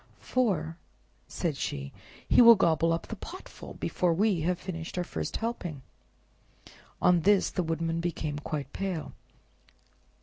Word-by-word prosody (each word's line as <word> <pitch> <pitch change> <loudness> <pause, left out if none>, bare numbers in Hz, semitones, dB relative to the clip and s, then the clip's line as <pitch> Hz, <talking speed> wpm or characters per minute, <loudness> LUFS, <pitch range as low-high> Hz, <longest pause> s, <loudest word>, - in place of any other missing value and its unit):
"For," 170 -11 0 0.5
said 165 -5 -2
she, 70 - -4 0.3
"he - - +6
will 235 -1 +10
gobble 165 -3 +3
up 165 - -1
the 225 - -6
potful 365 - -10
before 175 -2 0
we 195 -2 +2
have 175 +3 0
finished 165 -2 -6
our 180 - +1
first - - -4
helping." 175 - -4 1.2
On 180 -1 +5
this 195 +3 +3
the 185 - -1
Woodman 165 0 -1
became 155 -3 -3
quite 145 -2 -5
pale. 190 -5 -3
170 Hz, 135 wpm, -29 LUFS, 160-195 Hz, 1.2 s, will